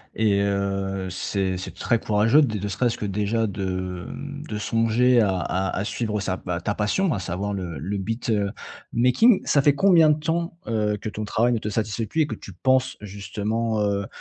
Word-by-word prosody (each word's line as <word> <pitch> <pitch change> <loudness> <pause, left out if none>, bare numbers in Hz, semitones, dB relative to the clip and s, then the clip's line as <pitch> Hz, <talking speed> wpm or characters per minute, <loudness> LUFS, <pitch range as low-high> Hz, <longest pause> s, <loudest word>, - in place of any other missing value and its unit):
et 100 -3 +2
heu, 100 -1 -1
c'est 95 0 -1
c'est 95 - -7
très 115 - +1
courageux 110 +8 +4
de, 110 -7 0
ne 105 +1 -3
serait-ce 115 +4 0
que 105 - -4
déjà, 105 +3 0
de, 95 -3 -3
hem, 145 0 -7
de 105 - -3
songer 115 +3 +3
à 95 -3 +1
à 95 +2 -1
à 100 - -1
suivre 105 -1 -2
sa 95 -1 -2
bah, 90 0 -4
ta 105 - -1
passion 155 - +1
à 100 - -2
savoir 95 +4 -3
le 90 -5 -4
le 100 +8 -3
beatmaking. 115 - +1
Ça 140 - +3
fait 145 0 +4
combien 165 -2 +5
de 150 - +3
temps, 170 +2 -2
heu, 105 -2 0
que 110 - -4
ton 105 0 -5
travail 120 +4 +2
ne 115 - 0
te 105 - -4
satisfait 110 +1 -2
plus 160 - 0
et 150 - +2
que 115 - -4
tu 100 - -9
penses 130 +7 +1
justement, 105 +3 -2
heu 100 -1 0
105 Hz, 200 wpm, -24 LUFS, 100-120 Hz, -, combien